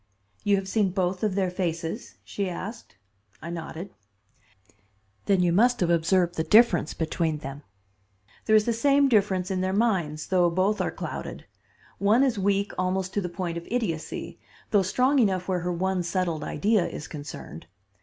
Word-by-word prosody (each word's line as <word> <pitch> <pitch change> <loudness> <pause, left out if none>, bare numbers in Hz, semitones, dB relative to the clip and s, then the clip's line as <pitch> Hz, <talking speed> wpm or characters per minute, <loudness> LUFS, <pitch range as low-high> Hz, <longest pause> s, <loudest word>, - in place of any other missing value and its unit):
"You 205 - +3
have 195 -1 -2
seen 205 -1 +1
both 185 0 -1
of 210 -3 0
their 190 -2 0
faces?" 170 +2 -3
she 200 -2 -3
asked. 200 - -7 0.4
I 170 - -7
nodded. 170 +2 -7 1.3
"Then 195 -3 +3
you 175 -1 +2
must 245 +6 +4
have 175 -2 +2
observed 170 +1 +2
the 160 - -1
difference 210 -6 +4
between 160 -1 -1
them. 140 0 -8 0.8
There 220 - +4
is 215 -1 +5
the 235 - +1
same 280 +4 +3
difference 195 -4 +2
in 185 -1 -1
their 185 0 0
minds, 185 -9 0
though 180 -2 +4
both 190 +5 +1
are - - 0
clouded. - - -6 0.5
One 215 +6 +4
is 245 -6 +1
weak 200 +1 +1
almost 185 0 -1
to 205 - 0
the 180 - -3
point 170 -1 -3
of 170 - -15
idiocy, 215 -10 -3 0.3
though 205 -3 +5
strong 255 +9 +2
enough 190 -6 +1
where 185 -2 0
her 175 +1 -2
one 185 +1 0
settled 175 -3 -1
idea 210 -3 +1
is - - -7
concerned. 145 - -9
185 Hz, 170 wpm, -26 LUFS, 170-205 Hz, 1.3 s, is